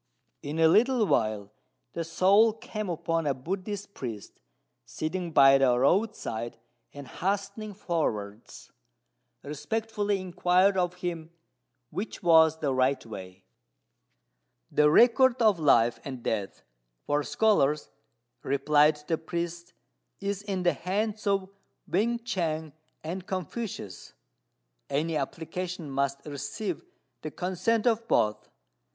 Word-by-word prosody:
In 145 +2 -5
a 165 0 +5
little 230 +6 +4
while 110 - 0 0.4
the 170 - -2
soul 195 +7 +4
came 215 -2 -6
upon 165 -1 -1
a 140 - +1
Buddhist 195 - -5
priest 115 - -7 0.4
sitting 170 +2 -4
by 135 -2 +7
the 125 -2 +4
roadside, 130 - 0 0.3
and, 140 -2 -10
hastening 200 +2 -3
forwards, 115 - -4 0.7
respectfully 205 +7 -2
inquired 185 +1 +2
of 180 -1 0
him 170 -3 -5 0.6
which 200 -1 -5
was 160 -2 +6
the 145 -4 -1
right 130 +1 +1
way. 95 -4 -10 1.3
"The 150 0 +4
record 245 - +5
of 215 -6 +4
life 120 -6 +4
and 130 -3 -7
death 105 -3 -3 0.4
for 145 0 +1
scholars," 150 -5 +1 0.5
replied 150 +2 +3
the 160 - 0
priest, 170 +1 -5 0.5
"is 200 0 -3
in 195 -3 -3
the 175 - +3
hands 210 +3 -2
of 195 -1 +1 0.4
Wên 235 +5 0
ch'ang 160 -7 -2 0.3
and 180 +4 -5
Confucius; 185 - -5 0.8
any 155 +4 -1
application 165 +2 -4
must 140 0 -1
receive 150 - -5 0.4
the 155 - -5
consent 185 +7 -1
of 230 -1 +1
both." 105 - +1
170 Hz, 115 wpm, -28 LUFS, 140-200 Hz, 1.3 s, by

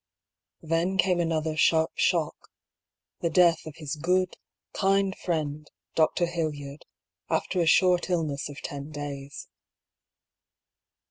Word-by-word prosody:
Then 165 +4 0
came 180 -1 +3
another 160 -2 0
sharp, 160 +1 +3
shock - - +1 0.5
— - - -52
^the 170 - 0
death 170 -1 +4
of 155 - -8
his 150 -3 -5
good, 180 +3 +1 0.4
kind 195 0 +2
friend. 155 -3 -3 0.2
Dr. 165 +2 +2
Hildyard, 155 -4 -4 0.4
after 180 - 0
a 165 - +1
short 180 +1 +4
illness 155 -6 -1
of 145 - -9
ten 140 +1 -6
days. 145 -2 -7
160 Hz, 120 wpm, -27 LUFS, 150-175 Hz, 0.5 s, death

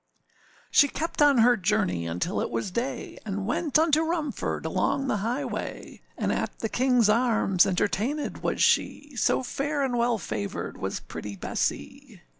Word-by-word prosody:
She 285 - +6
kept 315 +2 -3
on 290 -2 +6
her 240 +1 +6
journey 90 - 0
until 90 - -2
it - - -2
was 195 - -3
day, 240 +7 -4
And 200 -2 -3
went 290 +6 +1
unto 315 -1 +4
Rumford, 320 -3 -2
along 275 - 0
the 235 - 0
highway; 235 +7 -4 0.2
And - - 0
at - - -2
the 225 - -3
Kingâs 250 -2 +3
Arms 220 -6 +3
entertainèd 215 +10 -1
was - - 0
she, 290 -2 +1
So 250 - +1
fair 285 +3 -2
and 255 -2 0
well 235 -1 +2
favoured 110 - -4
was - - -3
pretty 105 -1 -7
Bessee. 95 - -4
240 Hz, 155 wpm, -26 LUFS, 195-285 Hz, 0.2 s, She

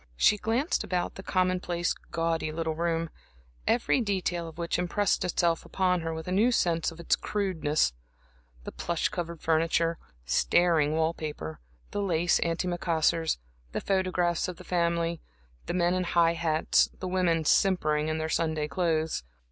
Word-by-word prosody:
She 210 - +5
glanced 235 - 0
about 180 -1 -2
the - - -8
commonplace, 180 -2 0 0.2
gaudy 165 -1 -1
little 160 0 -2
room, 165 0 -1 0.6
every 245 +2 +2
detail 185 -5 -1
of 160 0 -11
which 170 0 -1
impressed 190 +3 +1
itself 170 -2 +1
upon 180 -2 +1
her 165 0 -3
with 160 +1 -6
a - - -2
new 215 +7 +3
sense 170 -7 +1
of 165 - -13
its 170 - +2
crudeness; 160 - 0 0.7
the - - -6
plush 170 -1 -1
covered 170 -2 -5
furniture, 165 +1 +1 0.3
staring 155 - +3
wall 160 +1 +1
paper, 80 - -6 0.3
the 205 - -2
lace 175 -3 +2
anti 170 +2 -1
macassars, 165 -2 +1 0.4
the - - -1
photographs 180 -3 +1
of 180 -2 -6
the - - -11
family, 170 -1 0 0.5
the - - -2
men 175 0 +2
in 185 0 0
high 170 -1 +3
hats, 165 -2 +2
the 185 - -4
women 175 -3 +1
simpering 155 -5 +2
in 155 0 -1
their 160 0 -2
Sunday 160 -2 0
clothes. 160 - 0
170 Hz, 155 wpm, -28 LUFS, 160-180 Hz, 0.7 s, She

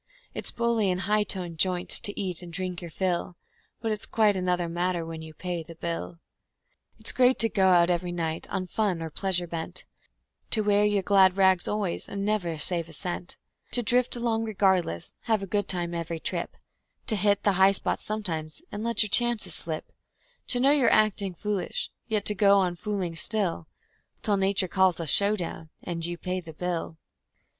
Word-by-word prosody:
It's - - -4
bully 235 -4 +1
in 180 - +1
a - - -4
high 210 +2 +2
toned 175 -5 -5
joint 180 0 +1
to 205 - 0
eat 185 -4 -2
and 175 -1 -9
drink 180 0 -4
your 170 - -7
fill, 180 0 -2 0.4
But 225 -1 -1
it's 215 0 -3
quite 215 -3 +3
another 180 -2 0
matter 175 0 -1
when 165 -1 -6
you 160 -1 -10
Pay 175 0 -3
the 165 +1 -11
bill. 170 +1 -4 0.8
It's - - -4
great 255 0 +4
to 225 - +2
go 190 -3 +3
out 175 -1 +5
every 175 0 -1
night 165 -2 -3
on 185 - -2
fun 185 -3 -1
or 160 - -5
pleasure 180 0 0
bent; 165 -1 -5 0.6
To 220 - +2
wear 205 0 +3
your 205 -2 +2
glad 190 -1 +5
rags 190 -2 +4
always 210 -4 -2
and 200 - -4
to - - -1
never 195 -6 0
save 170 +2 -1
a - - -12
cent; 175 +1 -5 0.4
To 245 - +3
drift 245 +2 +2
along 230 -2 0
regardless, 190 - +1
have 220 -3 +1
a - - -2
good 205 +1 -1
time 175 -2 -2
every 170 -1 -3
trip; - - -4 0.5
To 220 - +3
hit 200 0 +2
the 205 - +4
high 190 +1 +5
spots 195 - -1
sometimes, 165 -8 -3
and 205 - -5
to 230 - -2
let 230 -2 +3
your 215 - -4
chances 235 -5 +2
slip; 155 0 -2 0.6
To 245 - +2
know 270 +3 +5
you're 285 -4 +5
acting 200 -3 +2
foolish, 210 - -2 0.2
yet 215 -3 0
to 210 - +4
go 200 0 +5
on 180 -2 +1
fooling 190 -2 -3
still, 175 -2 0 0.6
Till 205 -2 +2
Nature 195 -1 +2
calls 190 -1 +3
a 165 - -2
show 200 +7 +3
down, 165 -4 -6
and 170 -2 -4
you 175 +1 -3
Pay 185 +1 -3
the 165 -2 -10
bill. 170 -1 -3
185 Hz, 200 wpm, -27 LUFS, 170-210 Hz, 0.8 s, out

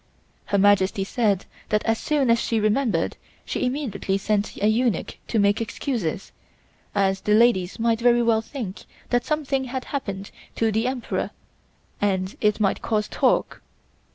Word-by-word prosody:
Her 200 - 0
Majesty 195 -1 +3
said 200 -2 0 0.2
that 210 0 +1
as 225 -1 +1
soon 280 -5 +1
as 230 - +4
she 225 - 0
remembered, 215 -5 +1 0.3
she - - -2
immediately 245 -8 -2
sent 205 +1 -1
a - - 0
eunuch 225 -3 0
to 230 - -1
make 205 +1 +3
excuses, 220 - -3 0.6
as 195 -1 +2
the 210 - +3
ladies 215 -6 +3
might 230 0 +1
very 240 0 +4
well 225 -1 +3
think 225 -5 -7 0.3
that 245 -1 +2
something 280 -3 -1
had 255 0 -4
happened 200 -8 -4 0.2
to 225 -1 +1
the 220 +3 +1
Emperor 255 -2 -2 0.7
and 190 -1 0
it 210 0 +2
might 200 -2 +1
cause 210 -2 0
talk. - - +1
220 Hz, 155 wpm, -24 LUFS, 200-245 Hz, 0.7 s, as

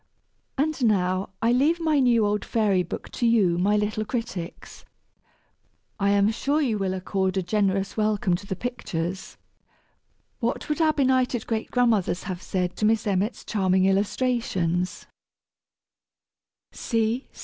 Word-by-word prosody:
And 295 -1 0
now, 185 -3 +1
I 230 - +4
leave 290 +7 +3
my 315 -3 +2
new 240 -4 +4
old 205 0 0
Fairy 205 -5 +1
Book 175 - -6
to 240 - -1
you, 195 -7 +3
my 205 +3 +2
little 210 +1 -1
critics. 215 -7 -6 1.2
I 200 0 +2
am 200 +1 +3
sure 280 +6 0
you 235 -8 0
will 190 -1 -1
accord 190 0 -1
a 190 - 0
generous 195 0 0
welcome 210 -3 +1
to 200 - -13
the 190 - -3
pictures. 190 -5 -4 1.0
What 240 +4 -2
would 300 +2 0
our 310 -1 +4
benighted 255 -4 +1
great 225 -1 -2
grandmothers 220 -8 +1
have 185 -2 -5
said 180 -1 -2
to 215 - 0
Miss 220 0 +2
Emmet's 205 +3 -1
charming 190 -3 +2
illustrations? 195 -4 0
210 Hz, 135 wpm, -25 LUFS, 190-240 Hz, 1.2 s, I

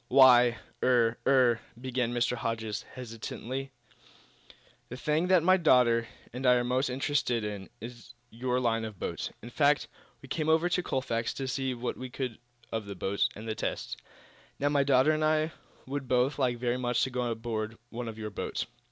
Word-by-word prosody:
"Why 125 -2 +7 0.2
er 120 -2 +3
er 125 -4 +5
" 115 - -21
began 125 -2 -1
Mr. 120 0 +1
Hodges, 110 -3 -3
hesitatingly, 125 +2 -5 1.2
"the 125 - -6
thing 150 +5 +1
that 185 -3 +5
my 185 +2 +6
daughter 125 -8 +4 0.3
and 125 +2 -5
I 125 -1 +6
are 120 - +2
most 130 +2 +1
interested 125 -3 0
in 105 -2 -5
is 120 +1 -10 0.2
your 125 +2 -1
line 115 -2 +1
of 110 -3 -6
boats. - - -3
In 120 - -8
fact, 145 +2 +3 0.4
we - - -10
came 155 +3 -1
over 160 +2 +4
to 180 0 +1
Colfax 115 -7 -2
to 135 - -3
see 130 -1 -1
what 120 +1 -3
we 130 0 -6
could 125 -2 -4 0.3
of 110 -2 -3
the 100 - -6
boats 95 +2 0
and 110 +2 -8
the 110 - -1
tests. - - -3 0.6
Now, 145 - +1
my 145 -1 +3
daughter 135 +1 +4
and 155 0 0
I 155 +1 +2 0.3
would 140 0 -4
both 130 +3 +2
like 125 -3 +1
very 120 0 0
much 120 -1 +1
to 130 - -1
go 125 -1 -1
aboard 115 -1 -3
one 120 0 -5
of 110 -1 -6
your 110 -1 -5
boats. - - -3
125 Hz, 185 wpm, -29 LUFS, 115-135 Hz, 1.2 s, Why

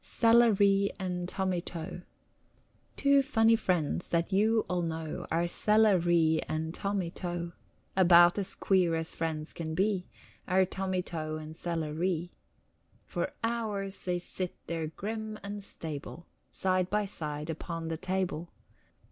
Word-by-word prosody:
CELLA 230 -1 +5
REE 200 0 +4
AND 180 -2 -3
TOMMY 185 -3 0
TO 175 +1 -6 0.9
Two 280 0 +4
funny 230 -5 +4
friends 175 -6 0
that 170 +3 0
you 220 +3 +3
all 180 -1 0
know 160 -2 -4
Are 170 +1 +1
Cella 210 +1 +4
Ree 165 -2 +3
and 160 +1 -2
Tommy 195 -3 -2
To. 175 -1 -4 0.4
About 175 0 +7
as 195 -1 -1
queer 180 -4 +2
as 160 0 -2
friends 160 -1 -3
can 160 -1 -4
be, 195 -1 +1 0.4
Are 190 +1 +4
Tommy 190 -1 -2
To 155 -3 -4
and 155 0 -7
Cella 165 -3 -3
Ree. 175 +1 -1 0.7
For - - -2
hours 215 -4 -2
they 180 -1 0
sit 180 +1 -4
there 165 -2 -2
grim 215 +6 -5
and 200 0 -5
stable 160 -1 -6 0.2
Side 185 -1 0
by 210 0 +1
side 150 -4 -5
upon 165 +1 -5
the 165 - -2
table. 185 -2 -2
180 Hz, 140 wpm, -30 LUFS, 165-200 Hz, 0.9 s, About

